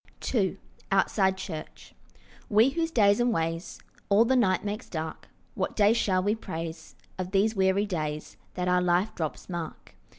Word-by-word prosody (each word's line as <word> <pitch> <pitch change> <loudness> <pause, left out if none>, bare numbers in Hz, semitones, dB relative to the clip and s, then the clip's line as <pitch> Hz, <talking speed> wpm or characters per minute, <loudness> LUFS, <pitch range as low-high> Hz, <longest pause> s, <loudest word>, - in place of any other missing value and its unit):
II 195 -5 +1 0.3
OUTSIDE 190 0 +2
CHURCH 160 -5 -8 0.6
WE 220 +4 +5
whose 325 +3 -1
days 205 -7 +4
and 240 0 +3
ways 165 -3 -2 0.3
All 205 +3 +5
the 260 +2 +2
night 195 -6 +2
makes 210 +4 -4
dark, 160 -1 -5 0.3
What - - -2
day 210 0 +5
shall 185 -5 +1
we 205 +2 +2
praise 165 -6 -6 0.2
Of 185 -1 -3
these 205 +3 +2
weary 190 +1 +2
days 155 -6 -4 0.2
That 180 0 -2
our 180 0 +3
life 180 +4 +2
drops 160 -3 -4
mark? 170 -3 -6
190 Hz, 160 wpm, -28 LUFS, 175-215 Hz, 0.6 s, WE